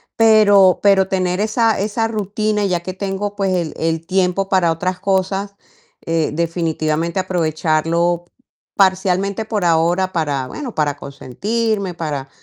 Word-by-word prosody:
pero 205 -4 +5
pero 195 -2 +4
tener 185 -1 -1
esa 220 +1 +1
esa 215 +3 -1
rutina, 210 -1 -1
ya 180 -2 0
que 185 +2 -6
tengo, 200 +1 -3
pues 195 -2 0
el 170 -3 -2
el 165 0 -2
tiempo 190 +1 0
para 180 -4 +3
otras 180 +3 -2
cosas, 195 +1 -1 0.5
eh, 165 -2 0
definitivamente 165 0 -1
aprovecharlo 170 -1 0 0.5
parcialmente 195 +2 +1
por 215 -3 -2
ahora 175 +3 +2
para 145 -6 -1
bueno, 255 - -7
para 145 -2 -1
consentirme, 200 - -3
para 145 -5 -4
185 Hz, 130 wpm, -18 LUFS, 165-200 Hz, 0.5 s, pero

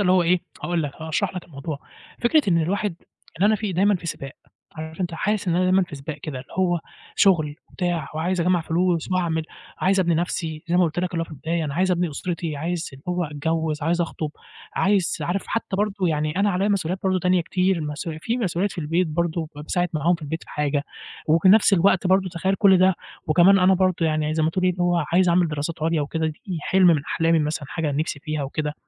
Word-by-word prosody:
اللي 185 -2 +3
هو 185 - +4
إيه، 175 +1 +2 0.2
هاقول 175 -2 0
لك، 145 -2 -4
هاشرح 160 +3 -1
لك 180 - -5
الموضوع. 145 -1 -6 0.4
فكرة 295 +6 +3
إن 165 -3 +3
الواحد، 200 +2 -1 0.5
إن - - +4
أنا 215 +1 +5
في 205 -2 -3
دايمًا 200 +4 +3
في 175 -2 -5
سباق، 135 -4 -5 0.4
عارف 160 +2 -8
أنت 175 -2 -2
حاسس 205 +3 -1
إن 170 - +2
أنا 185 - +2
دايمًا 185 +1 +4
في 175 - -6
سباق 140 +2 -6
كده 145 -2 -6
اللي 130 - -15
هو، 175 -2 +2 0.4
شُغل 160 -7 +3
وبتاع 175 -5 -2
وعايز 175 +3 -1
أجمّع 180 +1 +2
فلوس 170 +1 0
واعمل، 170 -3 0 0.4
عايز 190 +1 +2
أبني 170 -2 +2
نَفْسي 160 -2 -2
زي 175 - +2
ما 180 - +5
قُلت 160 0 -2
لك 180 0 -1
اللي 165 - -1
هو - - -1
في - - -17
البداية، 160 +2 -2
أنا 140 -2 -4
عايز 185 +3 +2
أبني 175 -2 +1
أُسرتي، 165 0 -4
عايز 170 +3 -3
اللي 135 0 -13
هو 180 0 0
أتجوِّز، 155 +1 -2
عايز 170 +3 +1
أخطُب، 160 -2 -3 0.4
عايز 195 -3 +1
عارف 185 +3 -2
حتّى 230 -4 -2
برضه 200 -2 0
يعني 155 0 -1
أنا 200 +1 +3
عليّا 195 +2 +1
مسؤوليات 185 -3 0
برضه 185 -1 +1
تانية 180 0 +2
كتير 185 +1 0
مسؤولي 155 +1 -4
في 230 +9 -2
مسؤوليات 195 -3 -1
في - - -10
البيت 165 +3 +1
برضه 165 0 -1
ب - - -8
باساعد 175 +3 0
معاهم 160 +3 +2
في 170 - -8
البيت 160 +2 -4
في - - -14
حاجة، 145 -1 -1 0.4
وفي 160 +4 +4
نْفس 210 +1 +6
الوقت 190 0 +4
برضه 190 0 +3
تخيّل 185 +2 -1
كل 195 -2 +5
ده 185 0 +4 0.3
وكمان 175 +5 +6
أنا 185 +1 +5
برضه 185 -3 +1
يعني 155 0 0
زي 160 - +1
ما 155 - +2
تقول 185 +2 -1
إيه، 185 - +4
اللي 180 0 -3
هو 175 -2 +2
عايز 180 +1 +4
أعمل 175 0 +3
دراسات 150 +1 -4
عُليا 165 0 +1
وكده، 160 +2 -1
دي 165 +3 -5
حِلْم 190 +4 +3
من 160 -5 +4
أحلامي 165 +1 +2
مثلًا، 150 0 -2
حاجة 160 -2 -2
أنا 140 - -2
نِفْسي 155 -2 -3
فيها 155 -1 -3
وكده، 150 +2 -3
170 Hz, 230 wpm, -23 LUFS, 155-185 Hz, 0.5 s, نْفس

